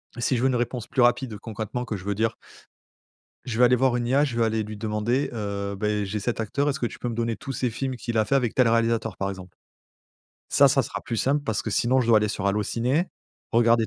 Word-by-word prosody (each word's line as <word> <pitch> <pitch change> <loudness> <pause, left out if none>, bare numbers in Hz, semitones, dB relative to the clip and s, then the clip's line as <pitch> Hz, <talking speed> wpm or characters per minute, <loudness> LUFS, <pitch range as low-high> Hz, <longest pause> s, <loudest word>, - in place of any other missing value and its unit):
Et 120 - -6
si 125 +1 +1
je - - -1
veux - - +5
une 130 - +1
réponse 120 -1 -2
plus 130 - 0
rapide, 120 -2 +2
concrètement, 110 +3 -5
que 115 -4 -4
je 95 - -11
veux 100 0 -1
dire 110 +2 0 1.1
je 120 -3 -3
vais 125 - +6
aller 125 +1 +5
voir 130 0 +2
une 120 -1 -1
IA. 135 +4 +3
Je 120 -5 -4
vais 115 - +3
aller 110 0 0
lui 105 0 -7
demander, 110 +5 -1
heu, 100 -2 -3
beh, 105 +1 -1
j'ai 105 +2 -3
cet 115 +4 -2
acteur, 140 +7 0
est-ce 140 - -2
que - - 0
tu - - -6
peux 120 - -3
me 115 - -4
donner 115 0 -1
tous 135 - -7
ses 125 -1 -1
films 130 +3 -3
qu'il 120 -1 -3
a 110 - +3
fait 135 - +1
avec 125 -5 +1
tel 125 -2 +4
réalisateur, 115 -3 +1
par 95 - -1
exemple. 95 -2 -9 0.9
Ça, - - +6
ça - - +3
sera - - -5
plus 115 - -3
simple 140 +5 +1
parce 110 -7 -1
que 110 - -4
sinon 125 +5 +2
je 120 - -1
dois 115 -2 +6
aller 105 - 0
sur 100 -1 -3
Allo 100 +2 +1
Ciné, 125 - 0 0.5
regarder 115 -1 +4
115 Hz, 265 wpm, -25 LUFS, 105-125 Hz, 1.1 s, vais